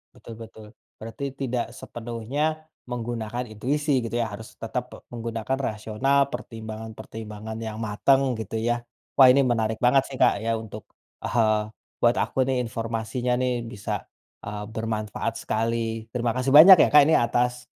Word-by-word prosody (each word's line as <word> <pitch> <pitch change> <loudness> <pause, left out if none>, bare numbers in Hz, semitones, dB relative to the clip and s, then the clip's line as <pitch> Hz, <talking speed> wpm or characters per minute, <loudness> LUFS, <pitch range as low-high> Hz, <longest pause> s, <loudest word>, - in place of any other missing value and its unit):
Betul, 115 - -11
betul. 110 -1 -11 0.3
Berarti 130 +5 -5
tidak 125 -3 -2
sepenuhnya 130 +8 -4 0.2
menggunakan 120 -1 -4
intuisi 140 +6 0
gitu 115 - -6
ya, 120 -2 0
harus 105 +2 -9
tetap 115 +2 -2
pe - - -9
menggunakan 115 +1 -3
rasional, 135 +4 0
pertimbangan-pertimbangan 110 -2 -7
yang 110 -1 -5
matang 125 +4 +2
gitu, 110 0 -4
ya. 120 +1 -1 0.3
Wah, 135 - +9
ini 140 +2 +5
menarik 115 -4 0
banget 130 +2 +4
sih 135 - -7
Kak - - +5
ya 115 0 0
untuk, 110 -1 -9 0.4
eee, 110 -2 +1 0.3
buat 120 0 +3
aku 130 - +1
nih 130 -1 0
informasinya 115 +1 -2
nih 125 -2 -1
bisa, 105 -3 -5 0.4
eee, 105 0 -5
bermanfaat 110 0 -3
sekali. 115 0 -2
Terima 120 -1 0
kasih 130 +1 0
banyak 170 +6 +11
ya - - +6
Kak, 150 - +10
ini 160 - +5
atas, 125 +1 0
115 Hz, 150 wpm, -25 LUFS, 110-125 Hz, 0.4 s, banyak